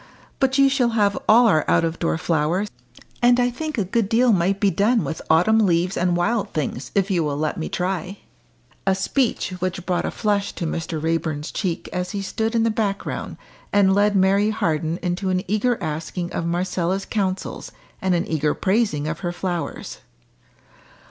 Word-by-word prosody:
But 265 0 +2
you 275 0 +6
shall 265 -3 +2
have 205 -1 +3
all 235 +3 +7
our 155 -9 +4
out - - +4
of 165 0 -2
door 165 -1 0
flowers, 165 +5 0 0.5
and 245 0 +5
I 245 0 +2
think 310 +3 -5
a 210 - +2
good 205 +2 0
deal 240 +1 +4
might 190 +2 +1
be 200 -1 +3
done 220 +4 +2
with 160 - -4
autumn 180 +8 +4
leaves 180 -2 +2
and 175 0 +1
wild 210 +5 0
things 145 -3 -3
if 195 0 +1
you 175 -3 +2
will 145 -2 -2
let 155 +1 -2
me 160 - -3
try." 185 +1 -3 0.7
A 190 - +4
speech, 220 +2 0
which 185 0 -3
brought 180 -1 0
a - - -1
flush 205 -1 -1
to 170 - -4
Mr. 160 0 -3
Raeburn's 160 -1 -2
cheek 180 -5 -3
as 180 +1 -3
he 200 -1 -3
stood 225 +3 -2
in 225 - +3
the 230 - +2
background, 205 -2 -3 0.3
and 200 -1 +4
led 205 +1 +3
Mary 195 +2 +3
Harden 160 -5 -1
into 180 +2 -1
an 185 0 0
eager 215 +5 +1
asking 165 +3 -4
of 165 - -2
Marcella's 180 +2 -1
counsels, 195 -3 -3 0.3
and 185 -1 +2
an 170 - 0
eager 155 -2 0
praising 190 -7 0
of 165 - -3
her 175 -2 -2
flowers. 175 -1 -4
190 Hz, 185 wpm, -22 LUFS, 170-210 Hz, 0.7 s, all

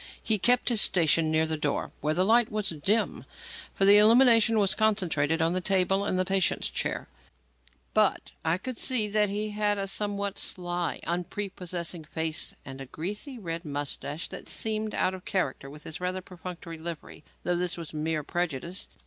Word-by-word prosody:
He 215 -2 +2
kept 245 +6 +4
his 230 -3 +4
station 165 -2 +4
near 160 0 +2
the 160 0 -1
door, 150 -1 -2
where 155 +2 0
the 185 +2 +3
light 230 +2 +4
was 210 -2 -1
dim 190 +8 0 0.5
for 195 - +2
the 205 +1 +8
illumination 230 0 +6
was 200 -3 +3
concentrated 170 -8 +1
on 165 +1 +2
the 185 - 0
table 195 +1 +2
and 185 - 0
the 185 - +2
patient's 190 -1 +1
chair - - -2 0.9
but - - +2
I 160 +2 +1
could 255 +5 -6
see 245 -5 +3
that 210 0 +3
he 210 +1 -2
had 210 0 +1
a 195 0 -2
somewhat 200 0 -1
sly, 175 -1 -3
unprepossessing 175 -2 -4
face 160 +1 -3
and 135 0 -8
a 135 - -8
greasy, 205 - -5
red 170 -5 -5
moustache 145 +1 -4
that - - -8
seemed 215 -1 -2
out 185 - +1
of 185 -1 -8
character 140 -7 -2
with 150 +2 -12
his 160 +2 -7
rather 185 +1 -2
perfunctory 175 -2 -9
livery; 165 -2 -7 0.2
though 180 - +1
this 175 0 -1
was 165 -2 -8
mere 155 0 -2
prejudice. 175 +2 -3
180 Hz, 175 wpm, -28 LUFS, 160-205 Hz, 0.9 s, the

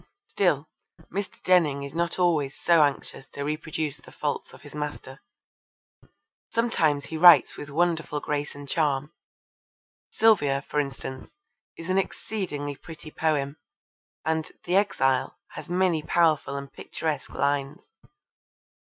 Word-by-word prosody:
Still, 155 -7 +1 0.5
Mr. 200 +1 -4
Denning 155 -7 +3
is 140 0 -7
not 170 +1 -1
always 160 -7 +1
so 170 -2 +5
anxious 140 -2 -1
to 140 - -5
reproduce 155 0 -3
the 140 - -16
faults 145 -1 -3
of - - -15
his 145 - -12
master. 150 -2 -6 1.3
Sometimes 160 -11 +1
he 160 - -5
writes 175 +1 +8
with 145 - -8
wonderful 160 -1 0
grace 145 0 -3
and 145 0 -9
charm. 145 0 0 1.0
Sylvia, 145 -12 +3
for 150 - 0
instance, 135 -2 -5 0.4
is 165 +2 -4
an 190 - +3
exceedingly 155 -8 -3
pretty 160 0 -11
poem, 150 -3 0 0.7
and 160 0 -1
The 175 - 0
Exile 135 -10 +2
has - - -9
many 180 -3 +2
powerful 155 -3 +2
and 140 0 -8
picturesque 155 -4 -4
lines. 140 - -1
150 Hz, 125 wpm, -26 LUFS, 140-170 Hz, 1.3 s, writes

